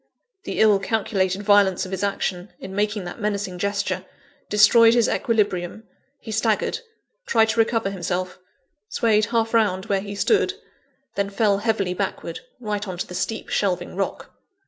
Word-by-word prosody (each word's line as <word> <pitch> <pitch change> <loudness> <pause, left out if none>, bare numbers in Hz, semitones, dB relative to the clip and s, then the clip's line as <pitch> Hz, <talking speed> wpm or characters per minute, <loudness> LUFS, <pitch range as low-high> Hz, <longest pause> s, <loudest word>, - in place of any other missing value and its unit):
The - - -4
ill 210 -2 +5
calculated 195 -2 -1
violence 200 -3 +4
of 185 - -9
his 190 0 -3
action, 195 -1 -2
in 190 - -8
making 205 0 0
that 175 +5 -8
menacing 200 -3 -2
gesture, 200 +1 -1 0.5
destroyed 225 +3 +6
his 235 -2 +4
equilibrium 205 -3 0 0.3
he 220 - -9
staggered 225 0 0 0.5
tried 225 - +3
to 230 +1 0
recover 225 -3 +2
himself 180 0 -3 0.5
swayed 215 -2 +2
half 225 0 0
round 200 -5 +2
where 195 -1 0
he 200 0 -7
stood 410 - +2 0.6
then 200 0 -1
fell 200 0 +2
heavily 200 -4 0
backward, - - -4 0.2
right 210 -2 -3
on 185 -2 -5
to - - -3
the - - -10
steep 220 +5 -3
shelving 185 -4 -1
rock. 195 0 -4
205 Hz, 155 wpm, -23 LUFS, 190-220 Hz, 0.6 s, destroyed